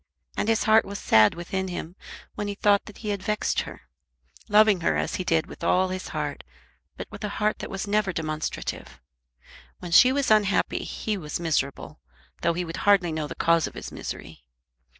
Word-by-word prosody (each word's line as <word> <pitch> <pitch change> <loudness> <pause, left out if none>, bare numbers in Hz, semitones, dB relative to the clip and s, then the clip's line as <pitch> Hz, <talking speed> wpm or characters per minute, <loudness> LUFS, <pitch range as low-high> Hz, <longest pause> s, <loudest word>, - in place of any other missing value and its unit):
And 210 - -1
his 225 -1 +2
heart 220 0 +5
was 200 +1 -6
sad 110 - +4
within 190 +2 -3
him 175 -1 -6 0.4
when 205 - -4
he 205 - -3
thought 205 0 +3
that 210 - -12
he - - -1
had 200 -2 -2
vexed 210 +2 0
her, - - -9 0.7
loving 210 -3 +5
her - - +1
as - - -2
he 185 - -3
did 165 -3 +1
with - - -12
all 185 +2 +2
his 185 0 -5
heart, 150 -2 -4 0.5
but - - -5
with - - -9
a 210 - -2
heart 215 0 0
that - - -6
was 195 +1 -4
never 205 -1 +1
demonstrative. 155 - -4 0.8
When 175 -1 -8
she 250 +9 +7
was 275 -3 0
unhappy 210 -2 +2
he 215 -2 -3
was 150 -2 -5
miserable, 150 -5 -2 0.4
though - - +2
he 175 +1 -2
would 165 +1 -6
hardly 195 -4 +3
know 155 -1 -3
the - - -7
cause 165 -1 +2
of - - -11
his - - -7
misery. 75 -4 -8
185 Hz, 195 wpm, -25 LUFS, 165-205 Hz, 0.8 s, she